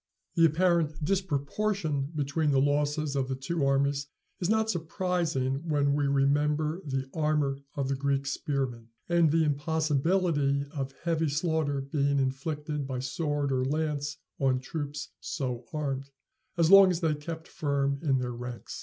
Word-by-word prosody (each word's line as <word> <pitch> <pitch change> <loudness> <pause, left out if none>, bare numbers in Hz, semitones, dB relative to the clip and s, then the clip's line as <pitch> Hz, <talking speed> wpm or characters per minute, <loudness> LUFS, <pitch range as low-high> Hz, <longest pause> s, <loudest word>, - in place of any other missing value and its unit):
The 165 - +5
apparent 160 -2 +2
disproportion 160 -3 -1
between 150 +1 0
the 135 -2 +4
losses 145 +1 +1
of 135 -2 0
the 130 - -2
two 140 +4 -2
armies 140 +1 +1 0.3
is 180 - -1
not 220 0 +2
surprising 165 -5 -1
when 145 -2 +2
we 145 -1 +1
remember 150 +4 +1
the 135 -2 -2
armor 150 -3 +1 0.2
of 140 -2 -1
the 135 - 0
Greek 140 0 0
spearmen, 135 -4 -2 0.2
and 170 -2 +4
the 160 +2 +3
impossibility 150 0 +1
of 135 -3 -3
heavy 165 -2 +1
slaughter 150 -2 0
being 140 +1 0
inflicted 145 +2 -2
by 130 -1 -3
sword 145 +2 -1
or 130 -1 +1
lance 150 +1 -1 0.2
on 130 -2 +2
troops 145 +1 -5
so 125 -3 -4
armed, 140 -3 -3 0.5
as 165 +1 +4
long 195 -1 +10
as 180 -1 -1
they 160 -2 +2
kept 160 +2 -6
firm 140 -2 -1
in 140 -5 +2
their 125 -1 -2
ranks. 120 0 -7
145 Hz, 150 wpm, -29 LUFS, 135-160 Hz, 0.5 s, long